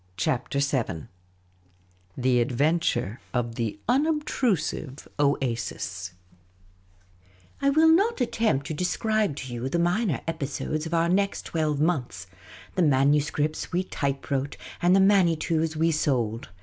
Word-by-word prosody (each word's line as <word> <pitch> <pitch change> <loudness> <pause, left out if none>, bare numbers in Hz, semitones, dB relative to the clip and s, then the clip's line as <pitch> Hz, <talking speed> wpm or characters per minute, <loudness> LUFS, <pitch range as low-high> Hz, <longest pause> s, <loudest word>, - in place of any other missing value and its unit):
CHAPTER 125 +8 -1
VII 130 - -1 1.1
THE 125 -1 +2
advunture; 125 - 0 0.2
of 120 -1 -1
the 115 -3 -3
unobtrusive 260 - 0
oasis 115 -9 -1 1.5
I 280 - +3
WILL 315 +3 +5
not 400 +7 +3
attempt 230 - +1
to 155 - -4
describe 210 +2 0
to 130 -3 -7
you 120 +2 -3
the 170 - 0
minor 175 - +1
episodes 155 0 -3
of 165 - -2
our 165 0 +3
next 200 +3 +1
twelve 155 -3 -1
months— 125 - -1 0.5
the 185 - 0
manuscripts 145 +1 +2
we 180 +2 +1
type 140 -7 -3
wrote 140 +1 -1 0.2
and 175 +2 +5
the - - +5
Manitous 165 -5 +3
we 165 +2 +2
sold. 120 -7 -1
150 Hz, 125 wpm, -26 LUFS, 130-180 Hz, 1.5 s, WILL